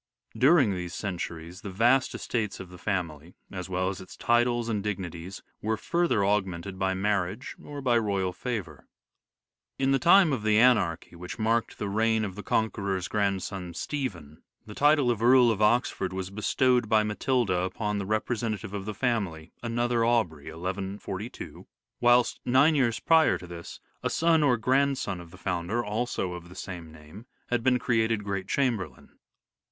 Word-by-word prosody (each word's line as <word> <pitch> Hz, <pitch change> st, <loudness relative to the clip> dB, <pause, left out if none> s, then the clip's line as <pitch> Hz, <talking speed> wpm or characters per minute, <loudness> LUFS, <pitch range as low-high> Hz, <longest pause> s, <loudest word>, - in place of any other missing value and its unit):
During 135 Hz, -4 st, +5 dB
these 90 Hz, -1 st, -5 dB
centuries 85 Hz, -2 st, -5 dB
the 100 Hz, -, -6 dB
vast 120 Hz, +7 st, +2 dB
estates 105 Hz, -4 st, -3 dB
of 95 Hz, -, -8 dB
the 90 Hz, 0 st, -12 dB
family, 85 Hz, -4 st, -3 dB, 0.2 s
as 90 Hz, -2 st, -6 dB
well 90 Hz, 0 st, 0 dB
as 95 Hz, -1 st, -4 dB
its 95 Hz, -, -12 dB
titles 120 Hz, 0 st, +2 dB
and 110 Hz, -3 st, -1 dB
dignities, 95 Hz, -3 st, -5 dB, 0.2 s
were 110 Hz, +1 st, -1 dB
further 170 Hz, -5 st, +1 dB
aug 100 Hz, +1 st, +3 dB
mented 95 Hz, +1 st, -7 dB
by 95 Hz, -1 st, +1 dB
marriage 100 Hz, +3 st, -1 dB
or 145 Hz, -1 st, -7 dB
by 120 Hz, -2 st, +3 dB
royal 100 Hz, -4 st, -1 dB
favour. 95 Hz, -, -5 dB, 0.9 s
In 135 Hz, 0 st, +1 dB
the 135 Hz, -, +3 dB
time 170 Hz, +2 st, +6 dB
of 125 Hz, -, -1 dB
the 105 Hz, 0 st, +3 dB
anarchy 100 Hz, -9 st, +3 dB
which 90 Hz, +5 st, -8 dB
marked 115 Hz, +1 st, 0 dB
the 105 Hz, -, -3 dB
reign 110 Hz, +2 st, +1 dB
of 95 Hz, -, -5 dB
the 105 Hz, -, -7 dB
Conqueror's 100 Hz, -4 st, -1 dB
grandson 95 Hz, -3 st, -2 dB
Stephen, 90 Hz, -, -5 dB, 0.2 s
the 105 Hz, -, -9 dB
title 145 Hz, -1 st, +4 dB
of 115 Hz, -2 st, -3 dB
Earl 125 Hz, 0 st, +6 dB
of 110 Hz, -1 st, -2 dB
Oxford 105 Hz, -4 st, +2 dB
was 95 Hz, 0 st, -4 dB
bestowed 120 Hz, +3 st, +1 dB
by 110 Hz, -1 st, +4 dB
Matilda 105 Hz, -2 st, 0 dB
upon 105 Hz, +3 st, -2 dB
the 100 Hz, -, -4 dB
repre 110 Hz, +2 st, -1 dB
sentative 105 Hz, -4 st, -3 dB
of 100 Hz, -1 st, -4 dB
the 105 Hz, -1 st, -5 dB
family, 95 Hz, -10 st, -2 dB
another 120 Hz, 0 st, 0 dB
Aubrey 110 Hz, -11 st, +1 dB
(1142), 95 Hz, +5 st, -6 dB, 0.3 s
whilst 120 Hz, 0 st, +4 dB
nine 130 Hz, +6 st, +4 dB
years 125 Hz, -6 st, +1 dB
prior 160 Hz, -1 st, +4 dB
to -, -, -11 dB
this 85 Hz, -1 st, -9 dB, 0.2 s
a -, -, -1 dB
son 165 Hz, -1 st, +3 dB
or 135 Hz, -5 st, +3 dB
grandson 130 Hz, -5 st, +1 dB
of 85 Hz, -, -13 dB
the -, -, -14 dB
founder, 90 Hz, +6 st, -2 dB
also 105 Hz, -4 st, -2 dB
of 85 Hz, 0 st, -9 dB
the 90 Hz, -, -13 dB
same 90 Hz, -4 st, -7 dB
name, 80 Hz, +9 st, -13 dB, 0.2 s
had 120 Hz, -1 st, +1 dB
been 125 Hz, +1 st, +3 dB
created 115 Hz, -3 st, +1 dB
Great 100 Hz, -2 st, -3 dB
Chamberlain. 120 Hz, -, -2 dB
105 Hz, 170 wpm, -27 LUFS, 95-120 Hz, 0.9 s, time